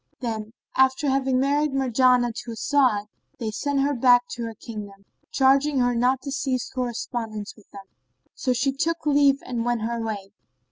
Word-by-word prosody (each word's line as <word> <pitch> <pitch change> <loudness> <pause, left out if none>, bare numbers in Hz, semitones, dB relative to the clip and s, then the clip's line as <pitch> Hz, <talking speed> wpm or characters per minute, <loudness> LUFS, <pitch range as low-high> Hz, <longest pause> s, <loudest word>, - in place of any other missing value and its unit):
Then, 220 -3 -4 0.2
after 265 +3 +3
having 265 -1 +1
married 285 +2 +1
Marjanah 250 -2 +3
to 235 - -7
As'ad, 245 -4 +2 0.3
they 220 -2 -3
sent 280 +5 -1
her 285 +1 +1
back 245 -1 +4
to 240 - -6
her 225 -1 -6
kingdom, 205 -3 -9 0.2
charging 275 +2 +3
her 245 -1 +2
not 250 +2 +1
to 275 - -5
cease 265 -3 -2
correspondence 235 -4 -4
with 215 - -21
them; 195 -1 -11 0.5
so 255 - -1
she 255 +3 +1
took 325 +5 -2
leave 280 -1 +3
and 240 -2 -3
went 240 -2 -1
her 235 +1 -2
way. 205 -3 -5
250 Hz, 170 wpm, -24 LUFS, 225-275 Hz, 0.5 s, back